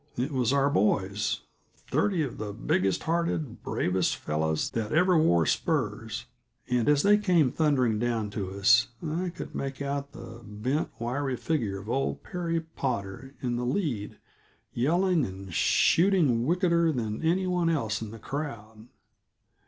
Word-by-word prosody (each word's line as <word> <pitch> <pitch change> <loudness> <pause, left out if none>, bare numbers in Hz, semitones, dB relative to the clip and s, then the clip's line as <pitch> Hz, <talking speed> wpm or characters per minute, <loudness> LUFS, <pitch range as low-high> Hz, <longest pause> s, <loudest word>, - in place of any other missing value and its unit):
It 130 +5 -1
was 130 -4 +1
our 140 0 +3
boys 100 -2 +1 0.3
thirty 185 -6 0
of 135 - -5
the 105 -1 -4
biggest 95 -3 0
hearted, 160 -6 -1
bravest 90 0 0
fellows 80 0 -1
that 110 -2 -3
ever 180 +3 +4
wore 85 - +4
spurs, - - -1 0.4
and, 125 +1 +1
as 145 -1 +4
they 210 +1 +5
came 175 -10 +3
thundering 130 -9 +2
down 115 -3 -1
to 100 -3 -4
us, 115 +5 +4 0.2
I 175 +4 -1
could 175 - -8
make 135 -1 -4
out 140 0 -3
the 120 -5 -10
bent, 115 +8 -2
wiry 130 +2 -2
figure 115 -12 -1
of 100 +2 -10
old 135 +4 -1
Perry 170 -2 -2
Potter 130 -5 -4
in 120 -1 -1
the 120 - -2
lead, 125 - -2 0.6
yelling 170 +6 +2
and 95 -3 -6
shooting 160 - +3
wickeder 170 -1 +3
than 110 -6 -3
any 175 +4 +1
one 180 -2 +1
else 115 -11 -1
in 110 - -5
the 115 - -9
crowd. 115 -6 -6
130 Hz, 150 wpm, -28 LUFS, 110-160 Hz, 0.6 s, they